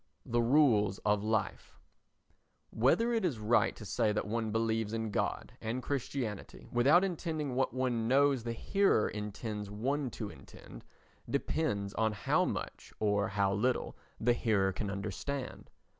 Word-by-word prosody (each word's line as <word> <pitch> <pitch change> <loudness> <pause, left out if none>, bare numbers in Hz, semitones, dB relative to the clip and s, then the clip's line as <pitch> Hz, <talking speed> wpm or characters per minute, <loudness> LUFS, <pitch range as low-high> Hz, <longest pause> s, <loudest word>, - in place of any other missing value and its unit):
The 120 0 +1
Rules 115 -7 +4
of 105 -1 +2
Life 110 -2 -2 0.9
Whether 225 - +3
it 225 - +1
is 160 -10 0
right 110 +3 +2
to 110 - -10
say 105 +2 +1
that 105 - -1
one 110 0 -2
believes 110 -1 0
in 110 -1 -2
God - - -2
and 120 +3 -3
Christianity 130 -6 -4
without 140 +9 +5
intending 160 -6 -2
what 130 +1 +1
one 125 -3 -1
knows 135 -1 +3
the 115 0 -3
hearer 195 - +2
intends 105 0 -5
one 130 +7 -1
to 110 -3 -6
intend - - -13 0.4
depends 100 -11 -1
on 110 -1 +1
how 105 - +1
much - - -5
or 105 -2 +2
how 100 0 +1
little 120 +6 0 0.2
the 120 +2 +3
hearer 100 -5 +1
can 100 +2 -3
understand. 105 +7 -5
115 Hz, 145 wpm, -32 LUFS, 105-130 Hz, 0.9 s, without